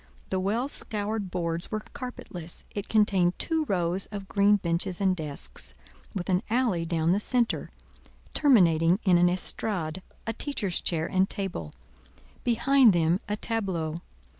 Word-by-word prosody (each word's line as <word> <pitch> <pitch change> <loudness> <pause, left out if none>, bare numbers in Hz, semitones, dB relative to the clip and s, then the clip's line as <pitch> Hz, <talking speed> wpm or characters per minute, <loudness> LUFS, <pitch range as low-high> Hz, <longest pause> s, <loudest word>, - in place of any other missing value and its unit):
The 190 - +1
well 215 +7 0
scoured 210 -6 -2
boards 170 -1 -1
were 215 -1 -3
carpetless; 180 - -7
it 205 -1 -5
contained 195 -5 +3
two 320 -2 0
rows 180 - 0
of 200 -2 -7
green 205 +1 +4
benches 175 -1 -1
and 190 -2 +2
desks, 65 - -6 0.4
with 180 -3 -3
an 185 -1 +2
alley 220 -8 +1
down 165 -1 +1
the 195 - +3
centre, 240 +2 0 0.6
terminating 175 - +4
in 180 -3 +4
an 175 0 +5
estrade, 180 -2 0 0.2
a 225 - -2
teacher's 210 - -2
chair 160 -2 0
and 190 +1 +1
table; 175 - -4 0.7
behind 245 0 +5
them 170 +1 +2
a 210 - 0
tableau. 180 -9 -2
190 Hz, 140 wpm, -27 LUFS, 170-215 Hz, 0.7 s, an